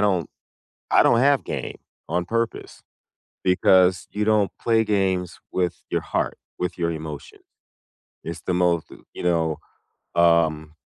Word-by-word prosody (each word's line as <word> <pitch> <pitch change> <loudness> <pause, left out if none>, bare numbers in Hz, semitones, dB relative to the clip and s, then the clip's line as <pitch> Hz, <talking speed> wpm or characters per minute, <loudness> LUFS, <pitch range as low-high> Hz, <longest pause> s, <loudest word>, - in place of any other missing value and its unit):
don't 95 -5 +1 0.6
I - - +5
don't 115 - +4
have 140 +1 +3
game, - - -5 0.3
on 90 0 0
purpose, 115 +4 -3 0.6
because 90 0 +4
you 105 +1 -1
don't 105 -2 +2
play 115 -1 +3
games 95 -4 0
with 90 -2 -2
your - - 0
heart, - - -2 0.2
with 90 0 -3
your 85 -1 0
emotion. 80 -2 -8 0.8
It's 85 0 -7
the - - -2
most, 90 -2 +1 0.2
you - - -7
know, 85 -3 +1 0.6
um 80 -2 +3
90 Hz, 130 wpm, -23 LUFS, 85-105 Hz, 0.8 s, I